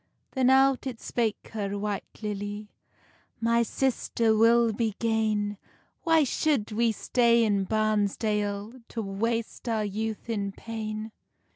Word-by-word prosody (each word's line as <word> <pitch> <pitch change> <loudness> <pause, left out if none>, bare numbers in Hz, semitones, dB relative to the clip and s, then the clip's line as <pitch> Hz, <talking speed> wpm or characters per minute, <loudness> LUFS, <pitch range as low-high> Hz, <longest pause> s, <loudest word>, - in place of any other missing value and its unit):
Then 260 -2 +2
out 270 0 +4
it 240 -3 -5
spake 225 -3 -2
her, 205 -2 -2
White 205 +1 -5
Lily; 205 0 -4 0.7
"My 230 +1 +3
sister, 230 -2 +1
we'll 230 +1 +5
be 220 -1 -1
gane; 215 -3 0 0.4
Why 325 -2 +4
shou'd 275 -5 0
we 230 +2 +2
stay 235 +1 +3
in 200 -3 +1
Barnsdale, 210 +1 0
To 230 - -4
waste 225 +4 -2
our 220 -2 0
youth 215 +2 -4
in 200 -4 -2
pain?" 215 0 -5
220 Hz, 125 wpm, -27 LUFS, 210-235 Hz, 0.7 s, we'll